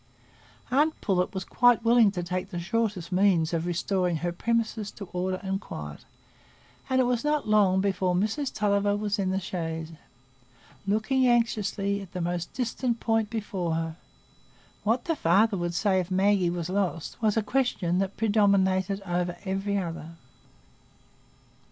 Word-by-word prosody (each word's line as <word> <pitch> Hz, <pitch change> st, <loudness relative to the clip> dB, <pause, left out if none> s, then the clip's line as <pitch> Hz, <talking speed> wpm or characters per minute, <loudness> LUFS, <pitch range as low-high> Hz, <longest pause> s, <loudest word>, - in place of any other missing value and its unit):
Aunt 300 Hz, +4 st, +2 dB
Pullet 180 Hz, -3 st, 0 dB
was 190 Hz, -3 st, -5 dB
quite 245 Hz, -2 st, +3 dB
willing 230 Hz, -2 st, +6 dB
to 175 Hz, -2 st, -3 dB
take 180 Hz, +2 st, -3 dB
the 175 Hz, -4 st, -4 dB
shortest 195 Hz, -1 st, -2 dB
means 180 Hz, -3 st, +3 dB
of 165 Hz, +1 st, -1 dB
restoring 180 Hz, 0 st, 0 dB
her 175 Hz, +2 st, -2 dB
premises 220 Hz, +2 st, -1 dB
to 205 Hz, -, -9 dB
order 185 Hz, +1 st, -1 dB
and 195 Hz, +1 st, -2 dB
quiet, 75 Hz, -1 st, -8 dB, 0.8 s
and 260 Hz, 0 st, +2 dB
it -, -, +5 dB
was 245 Hz, -1 st, 0 dB
not 300 Hz, -3 st, 0 dB
long 200 Hz, -3 st, +4 dB
before 190 Hz, -2 st, 0 dB
Mrs 220 Hz, +9 st, -1 dB
Tulliver 205 Hz, -1 st, +1 dB
was 205 Hz, 0 st, -2 dB
in 190 Hz, -1 st, 0 dB
the 190 Hz, +1 st, 0 dB
chaise, 165 Hz, -3 st, -4 dB, 1.0 s
looking 250 Hz, +6 st, +2 dB
anxiously 210 Hz, -4 st, +1 dB
at 190 Hz, -3 st, -11 dB
the 180 Hz, -, -4 dB
most 175 Hz, 0 st, -2 dB
distant 245 Hz, -1 st, -2 dB
point 225 Hz, -2 st, +1 dB
before 200 Hz, -7 st, -2 dB
her. 165 Hz, -1 st, -3 dB, 0.9 s
What 230 Hz, +4 st, +1 dB
the 330 Hz, -, 0 dB
father 205 Hz, -, +3 dB
would 175 Hz, -2 st, -2 dB
say 190 Hz, -1 st, +2 dB
if 180 Hz, -1 st, -3 dB
Maggie 190 Hz, -1 st, +2 dB
was 170 Hz, -1 st, -3 dB
lost, 185 Hz, -3 st, -2 dB
was 215 Hz, -1 st, +2 dB
a 220 Hz, -, +2 dB
question 210 Hz, -7 st, 0 dB
that 195 Hz, 0 st, -2 dB
predominated 200 Hz, -3 st, +2 dB
over 175 Hz, -1 st, -1 dB
every 195 Hz, +1 st, -1 dB
other. 165 Hz, -3 st, -5 dB
195 Hz, 155 wpm, -27 LUFS, 180-220 Hz, 1.0 s, willing